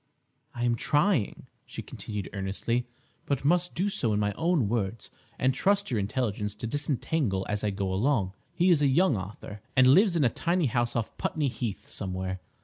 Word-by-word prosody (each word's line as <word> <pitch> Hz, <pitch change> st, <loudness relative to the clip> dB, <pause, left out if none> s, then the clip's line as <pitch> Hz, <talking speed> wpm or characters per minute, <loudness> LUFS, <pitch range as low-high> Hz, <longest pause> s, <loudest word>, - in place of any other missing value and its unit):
"I 120 Hz, -, -3 dB
am 120 Hz, -1 st, +3 dB
trying," 145 Hz, -, +1 dB, 0.2 s
she -, -, -7 dB
continued 105 Hz, -3 st, -6 dB
earnestly, 105 Hz, +5 st, -2 dB, 0.4 s
"but 140 Hz, -1 st, -1 dB
must 175 Hz, +3 st, +2 dB
do 185 Hz, +4 st, +1 dB
so 120 Hz, -, 0 dB
in 105 Hz, -, +1 dB
my 105 Hz, 0 st, 0 dB
own 165 Hz, -, +1 dB
words 110 Hz, -1 st, -2 dB, 0.3 s
and 130 Hz, +1 st, +2 dB
trust 200 Hz, +8 st, +2 dB
to -, -, -5 dB
your 110 Hz, -, +2 dB
intelligence 105 Hz, -1 st, -2 dB
to 110 Hz, -, -5 dB
disentangle 135 Hz, -5 st, 0 dB
as 105 Hz, -1 st, -2 dB
I 105 Hz, -, +2 dB
go 95 Hz, -1 st, -2 dB
along. 100 Hz, -3 st, +1 dB, 0.2 s
He 180 Hz, +1 st, +4 dB
is 160 Hz, -4 st, +4 dB
a 145 Hz, -, +4 dB
young 155 Hz, +2 st, +4 dB
author, 105 Hz, +1 st, -7 dB, 0.2 s
and 130 Hz, -, +7 dB
lives 180 Hz, -, +6 dB
in 160 Hz, -, +3 dB
a 125 Hz, -, +4 dB
tiny 170 Hz, +7 st, 0 dB
house 120 Hz, -1 st, 0 dB
off 115 Hz, -2 st, -2 dB
Putney 150 Hz, -3 st, 0 dB
Heath 120 Hz, -5 st, -5 dB
somewhere. 95 Hz, -1 st, -4 dB
120 Hz, 190 wpm, -28 LUFS, 105-150 Hz, 0.4 s, and